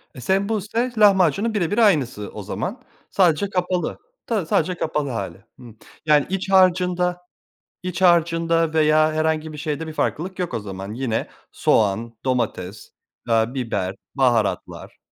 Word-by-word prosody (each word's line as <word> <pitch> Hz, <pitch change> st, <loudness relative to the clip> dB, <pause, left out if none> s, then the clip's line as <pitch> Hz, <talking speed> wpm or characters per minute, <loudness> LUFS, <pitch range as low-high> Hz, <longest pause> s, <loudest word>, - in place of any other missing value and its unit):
E, 125 Hz, -, -9 dB
sembusek, 215 Hz, -, -1 dB
lahmacunun 200 Hz, +1 st, +4 dB
birebir 205 Hz, +1 st, -1 dB
aynısı 140 Hz, -, +2 dB
o -, -, -7 dB
zaman, -, -, -4 dB, 0.3 s
sadece 185 Hz, +1 st, +2 dB
kapalı 180 Hz, -1 st, -1 dB, 0.3 s
tabii 210 Hz, -8 st, -1 dB
sadece 170 Hz, +3 st, +1 dB
kapalı 150 Hz, -4 st, -2 dB
hâli, 95 Hz, -5 st, -5 dB
hımm. 115 Hz, -3 st, -14 dB, 0.3 s
Yani, 150 Hz, -2 st, +4 dB
iç 195 Hz, 0 st, -3 dB
harcında 180 Hz, -1 st, +3 dB, 0.6 s
iç 180 Hz, 0 st, -4 dB
harcında 165 Hz, -2 st, +3 dB
veya 155 Hz, 0 st, +3 dB
herhangi 155 Hz, 0 st, 0 dB
bir -, -, -8 dB
şeyde 155 Hz, +2 st, -3 dB
bir 155 Hz, -, -6 dB
farklılık 185 Hz, +5 st, -2 dB
yok 180 Hz, -, -2 dB
o 115 Hz, -, -1 dB
zaman, 100 Hz, 0 st, -7 dB
yine 120 Hz, -3 st, -2 dB, 0.2 s
soğan, 110 Hz, +2 st, +1 dB
domates, 110 Hz, -6 st, -2 dB, 0.4 s
eee, 110 Hz, -1 st, +4 dB
biber, 105 Hz, -7 st, -2 dB, 0.2 s
baharatlar. 120 Hz, -6 st, 0 dB
160 Hz, 135 wpm, -22 LUFS, 125-185 Hz, 0.6 s, lahmacunun